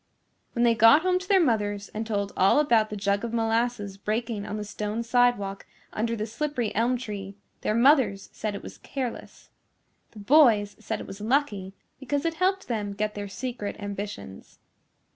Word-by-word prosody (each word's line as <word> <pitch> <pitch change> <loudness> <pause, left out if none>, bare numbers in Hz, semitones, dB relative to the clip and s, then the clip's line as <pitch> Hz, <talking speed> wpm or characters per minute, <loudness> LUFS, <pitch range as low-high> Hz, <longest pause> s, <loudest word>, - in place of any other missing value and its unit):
When 235 - +1
they 235 -1 +5
got 225 +8 +6
home 365 0 +2
to 370 - -10
their 390 -1 +5
mothers 205 - 0
and 220 +1 -5
told 200 -2 -1
all 190 +9 +4
about 230 -7 +3
the 210 - -5
jug 200 +1 0
of 235 -1 -4
molasses 225 -3 0
breaking 215 0 -2
on 210 - -4
the 210 - -4
stone 210 +2 -4
sidewalk 235 -5 +1 0.3
under 230 +2 -1
the 215 -1 -3
slippery 240 0 -2
elm 240 +4 +1
tree, 200 -5 -6 0.3
their 215 - 0
mothers 235 -6 +4
said 210 -2 -3
it - - -7
was - - -10
careless. 255 -4 -6 0.6
The - - -17
boys 215 -4 +4
said - - -4
it - - -7
was 195 +1 -9
lucky 210 -6 0 0.2
because 285 +3 -2
it 330 - +1
helped 375 +3 0
them 210 -4 -2
get 210 +1 -2
their 205 0 -5
secret 220 +1 -5
ambitions. 200 - -7
220 Hz, 180 wpm, -26 LUFS, 205-245 Hz, 0.6 s, got